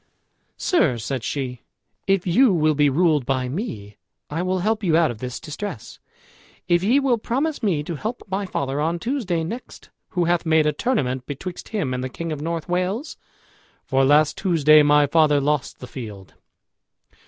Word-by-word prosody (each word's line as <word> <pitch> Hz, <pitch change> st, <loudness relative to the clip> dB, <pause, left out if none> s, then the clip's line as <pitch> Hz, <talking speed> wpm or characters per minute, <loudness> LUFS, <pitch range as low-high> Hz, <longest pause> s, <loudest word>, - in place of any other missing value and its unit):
"Sir," 165 Hz, -, +2 dB
said 120 Hz, +2 st, -4 dB
she, 125 Hz, -4 st, -4 dB, 0.5 s
"if 195 Hz, -2 st, +2 dB
you 220 Hz, +7 st, +4 dB
will 155 Hz, -1 st, +3 dB
be 145 Hz, 0 st, +3 dB
ruled 155 Hz, -1 st, +2 dB
by 130 Hz, 0 st, -1 dB
me, 125 Hz, -, -5 dB, 0.3 s
I 160 Hz, +3 st, -1 dB
will 185 Hz, +1 st, 0 dB
help 220 Hz, 0 st, 0 dB
you 165 Hz, -4 st, +3 dB
out 165 Hz, -5 st, +3 dB
of 110 Hz, -, -9 dB
this 125 Hz, 0 st, -5 dB
distress. 155 Hz, -, -7 dB, 0.7 s
If 175 Hz, -1 st, +3 dB
ye 240 Hz, +8 st, +4 dB
will 260 Hz, -4 st, +1 dB
promise 280 Hz, +7 st, -1 dB
me 180 Hz, -10 st, 0 dB
to 170 Hz, -, -5 dB
help 225 Hz, -, -5 dB
my 195 Hz, +1 st, -2 dB
father 140 Hz, -4 st, -2 dB
on 165 Hz, +3 st, 0 dB
Tuesday 200 Hz, -, -2 dB
next, 230 Hz, +10 st, -8 dB, 0.2 s
who 180 Hz, -4 st, 0 dB
hath 175 Hz, 0 st, +1 dB
made 160 Hz, -2 st, +3 dB
a 150 Hz, -, +2 dB
tournament 130 Hz, -, -1 dB
betwixt 175 Hz, +6 st, -7 dB
him 160 Hz, -, -2 dB
and 125 Hz, 0 st, -3 dB
the 130 Hz, -, -3 dB
king 165 Hz, +5 st, -5 dB
of 150 Hz, -2 st, -4 dB
North 165 Hz, 0 st, -3 dB
Wales; 185 Hz, -, -2 dB, 0.7 s
for 135 Hz, 0 st, +2 dB
last 145 Hz, +2 st, +4 dB
Tuesday 155 Hz, -5 st, +5 dB
my 145 Hz, 0 st, +5 dB
father 150 Hz, 0 st, +3 dB
lost 140 Hz, -1 st, -1 dB
the -, -, -9 dB
field." 105 Hz, -, -9 dB
160 Hz, 175 wpm, -22 LUFS, 140-190 Hz, 0.7 s, Tuesday